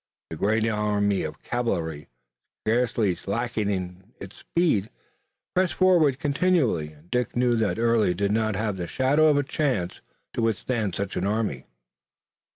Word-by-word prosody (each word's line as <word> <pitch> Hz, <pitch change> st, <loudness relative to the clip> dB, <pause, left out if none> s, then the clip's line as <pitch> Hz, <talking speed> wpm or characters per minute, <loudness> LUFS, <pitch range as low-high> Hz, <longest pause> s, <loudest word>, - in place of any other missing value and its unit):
The -, -, -4 dB
great 110 Hz, +6 st, +1 dB
army 105 Hz, -2 st, +1 dB
of -, -, -6 dB
cavalry, 85 Hz, -11 st, -2 dB, 0.6 s
scarcely 115 Hz, -3 st, +2 dB
slacking 100 Hz, -2 st, -3 dB, 0.2 s
speed, 130 Hz, -, 0 dB, 0.6 s
pressed 185 Hz, -1 st, +1 dB
forward 170 Hz, -8 st, +4 dB
continually, 140 Hz, -, +1 dB
and 75 Hz, +3 st, -22 dB
Dick 125 Hz, -1 st, -1 dB
knew 120 Hz, 0 st, +3 dB
that 110 Hz, -2 st, 0 dB
Early 115 Hz, -5 st, +2 dB
did 100 Hz, +2 st, 0 dB
not 110 Hz, -1 st, +1 dB
have 105 Hz, -1 st, -2 dB
the 85 Hz, -1 st, -4 dB
shadow 145 Hz, -, +3 dB
of 150 Hz, -2 st, +4 dB
a 145 Hz, -, +2 dB
chance 130 Hz, -, -1 dB, 0.3 s
to -, -, -2 dB
withstand 115 Hz, -2 st, -1 dB
such 100 Hz, -1 st, -3 dB
an -, -, 0 dB
army. 105 Hz, -, -1 dB
110 Hz, 140 wpm, -25 LUFS, 95-125 Hz, 0.6 s, forward